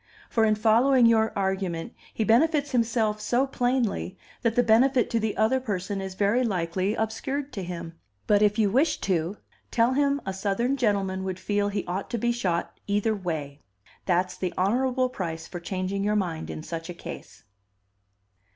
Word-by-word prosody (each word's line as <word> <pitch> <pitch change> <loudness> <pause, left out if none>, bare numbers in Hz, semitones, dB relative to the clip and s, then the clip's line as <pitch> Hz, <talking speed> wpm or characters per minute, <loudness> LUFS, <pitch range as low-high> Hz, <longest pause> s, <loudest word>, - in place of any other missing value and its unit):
For 225 -1 +3
in 215 -1 +3
following 235 +4 +4
your 220 -1 +4
argument, 190 -1 -2 0.2
he 220 - -1
benefits 285 +6 +3
himself 225 -3 +1
so 245 +5 +2
plainly 245 -7 -1 0.2
that 230 -1 +1
the 245 - +4
benefit 245 +3 +3
to 230 - +2
the 220 -1 -2
other 220 +5 +3
person 200 -4 -3
is 190 -1 -6
very 205 +6 +2
likely 185 -1 -1
obscured 265 +6 -3
to 195 - -4
him. 170 -2 -6 0.3
But, 205 0 +3
if 210 0 +3
you 210 -3 +3
wish 285 +8 +2
to, 180 +1 -1 0.3
tell 235 +2 +2
him 280 +1 +2
a 190 - -2
Southern 205 +7 0
gentleman 200 -6 0
would 185 -1 -4
feel 205 0 0
he 200 -1 -3
ought 185 +3 -4
to 240 - -2
be 240 +2 +1
shot 180 -8 -2
either 205 +2 +1
way. 155 -7 -4 0.5
That's 180 0 +1
the 185 -2 -3
honorable 255 +6 +2
price 165 -8 -5
for 175 - -7
changing 185 +2 -3
your 210 +1 +1
mind 175 -6 -2
in 155 - -6
such 165 +1 -6
a 175 - -6
case." - - -9
210 Hz, 175 wpm, -26 LUFS, 185-240 Hz, 0.5 s, following